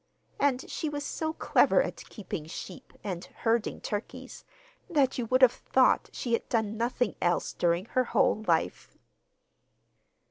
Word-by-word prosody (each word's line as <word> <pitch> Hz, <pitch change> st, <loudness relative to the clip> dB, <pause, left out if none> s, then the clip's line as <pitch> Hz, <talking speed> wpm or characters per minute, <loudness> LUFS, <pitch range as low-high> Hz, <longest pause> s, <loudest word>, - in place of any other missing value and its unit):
And 275 Hz, -2 st, +1 dB
she 310 Hz, -, -3 dB
was 290 Hz, -1 st, -4 dB
so 315 Hz, +1 st, -2 dB
clever 320 Hz, -, +3 dB
at -, -, -7 dB
keeping 180 Hz, -7 st, -6 dB
sheep 180 Hz, +2 st, -9 dB
and 180 Hz, -4 st, -4 dB
herding 230 Hz, -1 st, -1 dB
turkeys 205 Hz, +1 st, -6 dB, 0.5 s
that 275 Hz, -6 st, +2 dB
you 235 Hz, -, -2 dB
would 255 Hz, +3 st, +3 dB
have 250 Hz, -, +9 dB
thought 260 Hz, +1 st, +2 dB
she 235 Hz, -, -3 dB
had 230 Hz, -, -1 dB
done 220 Hz, -2 st, 0 dB
nothing 235 Hz, -1 st, 0 dB
else 175 Hz, 0 st, +1 dB
during 175 Hz, +2 st, +1 dB
her 255 Hz, +2 st, 0 dB
whole 215 Hz, -, +2 dB
life! 165 Hz, -2 st, 0 dB
235 Hz, 145 wpm, -29 LUFS, 200-260 Hz, 0.5 s, have